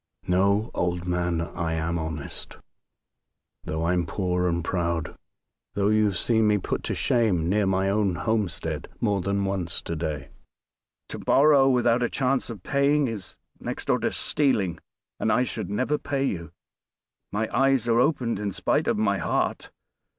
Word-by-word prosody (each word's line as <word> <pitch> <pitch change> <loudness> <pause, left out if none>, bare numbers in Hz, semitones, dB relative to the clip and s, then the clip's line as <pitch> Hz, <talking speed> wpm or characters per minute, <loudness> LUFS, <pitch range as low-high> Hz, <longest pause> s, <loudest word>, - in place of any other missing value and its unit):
No! 100 +4 +2
old 90 0 -1
man. 90 -1 0
I 85 -1 -3
am 80 +1 -1
honest, 80 -2 -5 1.1
though 80 +1 -2
I'm 90 -1 +1
poor 90 0 0
and 85 -1 0
proud, 85 -2 -2 0.6
though 100 0 +2
you 110 0 +3
have 100 -4 0
seen 110 -2 +2
me 105 0 +4
put 95 - -3
to - - -2
shame 105 -9 +1
near 100 +2 +2
my 95 0 +1
own 100 -2 +1
homestead 85 -7 -1
more 105 -4 +1
than 100 +1 0
once 95 -4 0
to 85 - -4
day. 80 -2 -4 0.8
To - - -6
borrow 140 -1 +5
without 125 -1 +3
a 120 - +1
chance 130 -1 0
of 105 -6 -8
paying 140 0 +2
is 105 -6 -6 0.2
next - - -5
door - - +2
to - - 0
stealing; 100 - +1 0.4
and - - +1
I 125 - +3
should 125 - -4
never 130 +8 0
pay 140 -1 -2
you. 85 - -3 0.8
My 110 +2 -1
eyes 135 -3 +3
are 115 0 +3
opened 125 -6 +1
in 105 -1 -2
spite - - 0
of - - +1
my 100 -2 +1
heart. - - -1
100 Hz, 165 wpm, -25 LUFS, 85-115 Hz, 1.1 s, borrow